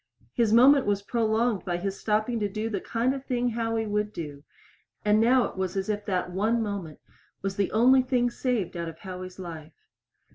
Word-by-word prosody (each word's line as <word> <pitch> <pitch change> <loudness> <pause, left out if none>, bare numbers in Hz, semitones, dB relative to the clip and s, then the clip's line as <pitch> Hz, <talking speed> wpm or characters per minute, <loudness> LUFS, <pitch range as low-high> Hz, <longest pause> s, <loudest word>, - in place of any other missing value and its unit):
His 230 -3 +2
moment 260 +3 +6
was 200 -1 0
prolonged 225 -1 0
by 175 -1 -2
his 195 +2 -4
stopping 215 +2 0
to 205 -1 -1
do 215 +3 -3
the 200 -3 -2
kind 240 +3 0
of 270 -1 -6
thing 245 -2 0
Howie 225 -1 -1
would 210 0 -1
do, 145 -6 -7 0.6
and 210 +1 +4
now 250 +2 +5
it - - -4
was 190 0 -2
as 195 +2 -2
if 210 0 -2
that 180 -2 -1
one 215 +6 +1
moment 195 -7 -5 0.4
was 195 0 -2
the 200 -1 0
only 255 +4 +5
thing 250 -1 +1
saved 235 -9 -2
out 170 -1 -3
of 160 - -11
Howie's 185 0 -8
life. 165 -4 -8
210 Hz, 195 wpm, -27 LUFS, 190-235 Hz, 0.6 s, moment